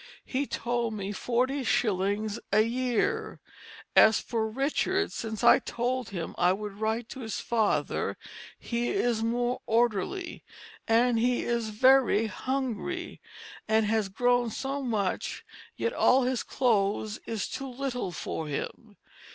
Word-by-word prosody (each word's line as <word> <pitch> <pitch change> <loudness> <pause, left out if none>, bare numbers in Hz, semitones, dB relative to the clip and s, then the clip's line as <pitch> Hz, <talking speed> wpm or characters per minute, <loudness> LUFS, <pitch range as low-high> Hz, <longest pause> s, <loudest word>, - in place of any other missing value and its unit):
He 275 +1 -2
told 235 -2 -2
me 200 -1 -4
40 255 +6 0
shillings 205 -1 0
a 210 +2 +5
yeare. 245 +1 -1 0.6
As 220 0 +7
for 220 -2 -2
Richard 300 - 0
since 220 -2 -5
I - - +7
told 250 +1 -2
him 175 -4 -5
I 180 +1 +4
would 210 +1 -5
write 220 +2 -1
to 265 - -8
his 225 -4 -4
Father 225 -3 0 0.4
he 235 0 -2
is 245 - +1
more 240 +2 0
orderly, 235 - 0 0.2
& - - -20
he 240 +1 +3
is 235 -2 -1
very 255 0 +4
hungry, 265 - -3 0.5
and 220 0 +3
has 215 -2 +1
grown 245 +3 +2
so 275 +5 -3
much 215 -7 -2 0.3
yt 465 - -1
all 265 - +4
his 250 -1 0
Clothes 215 -3 0
is 225 -3 -2
too 270 0 -5
Little 250 -6 -3
for 160 -2 -4
him. 205 +8 -6
235 Hz, 135 wpm, -28 LUFS, 215-255 Hz, 0.6 s, As